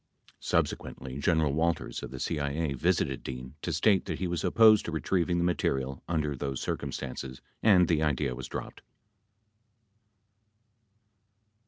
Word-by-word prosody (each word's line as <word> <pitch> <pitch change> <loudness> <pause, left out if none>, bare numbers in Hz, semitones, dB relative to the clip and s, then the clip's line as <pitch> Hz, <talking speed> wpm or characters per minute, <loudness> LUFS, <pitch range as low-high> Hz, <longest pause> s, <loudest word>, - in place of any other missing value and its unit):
Subsequently, 65 +1 -2
General 80 -2 +2
Walters 85 +2 -1
of - - -6
the 65 - -8
CIA 70 +2 -1
visited 65 0 0
Dean 65 0 -7
to - - -2
state 100 -4 +3
that 80 -5 -3
he 95 - -2
was 85 -1 -2
opposed 110 -2 +6
to - - -3
retrieving 85 +2 0
the 85 - +1
material 70 -6 -1
under 75 -4 -1
those 70 0 -3
cir - - -1
cumstances 65 0 -6 0.2
and 95 -5 +5
the 80 -3 +2
idea 70 -3 0
was 65 0 -6
dropped. - - -7
75 Hz, 140 wpm, -29 LUFS, 65-85 Hz, 0.2 s, opposed